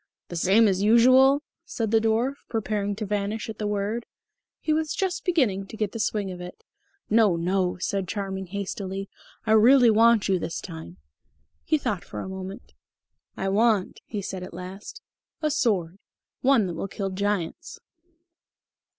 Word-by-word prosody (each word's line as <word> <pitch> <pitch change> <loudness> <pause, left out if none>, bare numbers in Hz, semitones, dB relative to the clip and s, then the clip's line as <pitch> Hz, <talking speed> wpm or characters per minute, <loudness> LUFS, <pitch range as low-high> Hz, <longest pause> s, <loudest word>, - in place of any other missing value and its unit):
"The 175 - -6
same 195 +6 +4
as 190 -1 +1
usual?" 255 +6 +6 0.2
said 225 -9 -3
the 225 - +5
dwarf, 225 +4 +1 0.2
preparing 210 -2 -1
to 215 +1 -4
vanish 210 +2 -2
at 220 - -7
the 210 - -1
word. 210 +3 -2 0.5
He 310 - 0
was 310 0 -1
just 380 -2 -1
beginning 240 - +1
to 220 - -10
get 215 -2 0
into - - -26
the - - -7
swing 210 -3 -1
of 180 -1 -8
it. 180 0 -10 0.4
"No, 215 -4 +4
no," 180 +2 0
said 190 +1 -2
Charming 190 -1 -4
hastily. 195 0 -5 0.4
"I 220 - 0
really 235 +2 +7
want 225 0 +4
you 190 -2 +2
this 165 0 -4
time." 85 +2 -9 0.7
He 310 - +2
thought 210 - -2
for - - -8
a - - -6
moment. 190 +1 -8 0.6
"I 195 - -1
want," 210 -1 +2
he 205 -3 -4
said 190 -1 -5
at 180 -2 -8
last, 195 - -9 0.4
"a 305 -1 0
sword. 195 - 0 0.4
One 260 -5 +4
that 175 - -3
will 165 - -4
kill 195 0 -4
giants." 200 -3 -3
205 Hz, 170 wpm, -25 LUFS, 190-230 Hz, 0.7 s, really